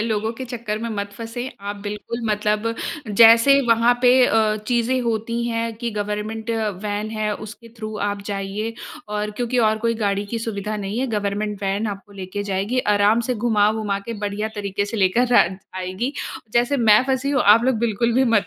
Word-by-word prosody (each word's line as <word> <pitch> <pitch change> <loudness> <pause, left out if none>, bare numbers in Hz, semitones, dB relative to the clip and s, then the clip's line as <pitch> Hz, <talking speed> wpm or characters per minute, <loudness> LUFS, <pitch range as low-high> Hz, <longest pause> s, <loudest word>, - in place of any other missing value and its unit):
लोगों 220 0 -1
के 260 - -4
चक्कर 230 -4 -4
में 230 +1 -4
मत 200 0 -4
फँसे। 230 +3 -6
आप 205 +1 -5
बिल्कुल 210 +3 -5
मतलब 210 +2 0 0.4
जैसे 230 +5 +7
वहाँ 230 +1 +4
पे 245 - +6 0.2
अ, 215 -1 +2
चीज़ें 245 +2 +1
होती 230 0 -1
हैं 230 0 -1
कि 235 +1 -3
गवर्नमेंट 210 +2 -3 0.3
वैन 210 +1 -3
है 215 -1 -1
उसके 215 +2 -10
थ्रू 215 -1 -5
आप 200 0 -4
जाइए 205 +3 -3 0.3
और 210 0 -2
क्योंकि 245 +3 -2
और 220 -2 +3
कोई 230 +1 0
गाड़ी 200 0 0
की 230 +3 -3
सुविधा 215 -2 -4
नहीं 205 +2 -4
है 265 - 0
गवर्नमेंट 205 0 -2
वैन 200 +3 0
आपको 205 0 -7
लेके 195 +1 -5
जाएगी 200 +5 -1 0.2
आराम 205 +3 +4
से - - +1
घुमा-वुमा 215 -2 +1
के 230 +4 -6
बढ़िया 205 +1 -2
तरीके 200 -1 -2
से 205 +3 -5
लेकर 225 +6 +2
अ, 170 - +6
जाएगी। 185 +6 -5 0.4
जैसे 245 +4 +2
मैं 220 -3 +5
फँसी 265 +1 0
हूँ 270 -3 +2
आप 215 +3 +6
लोग 255 -3 +2
बिल्कुल 235 +1 +1
भी 260 +2 +4
मत 225 -4 +2
215 Hz, 185 wpm, -22 LUFS, 205-230 Hz, 0.4 s, जैसे